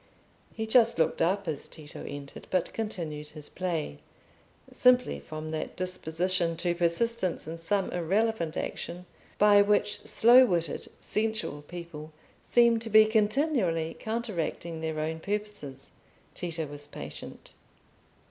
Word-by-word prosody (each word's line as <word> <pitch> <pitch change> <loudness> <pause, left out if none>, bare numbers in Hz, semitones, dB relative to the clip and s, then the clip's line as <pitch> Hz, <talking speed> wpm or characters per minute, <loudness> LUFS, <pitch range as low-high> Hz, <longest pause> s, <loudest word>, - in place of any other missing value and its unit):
He 220 - -4
just 230 +1 +4
looked 160 - +1
up 190 +3 +1
as 150 -3 -3
Tito 150 -2 -9
entered, 140 -1 -8
but 185 -2 0
continued 165 -9 -4
his 150 -1 -10
play, 165 - -3 0.7
simply 250 0 +4
from 155 0 -7
that 155 0 -4
disposition 180 -1 -1
to 175 0 +1
persistence 175 +2 0
in 165 +1 -6
some 190 +4 0
irrelevant 180 0 0
action, 175 +1 -5 0.3
by 205 0 +7
which 205 0 +2
slow 245 +3 +7
witted 170 - -1
sensual 220 -9 -2
people 160 -1 -9 0.3
seem 235 -1 +4
to 225 0 -6
be 215 0 +8
continually 215 - +1
counteracting 185 -7 -3
their 160 -1 -2
own 160 +1 -2
purposes. 200 -9 -5 0.4
Tito 165 -2 -3
was 145 0 -8
patient. - - -9
175 Hz, 125 wpm, -29 LUFS, 160-215 Hz, 0.7 s, be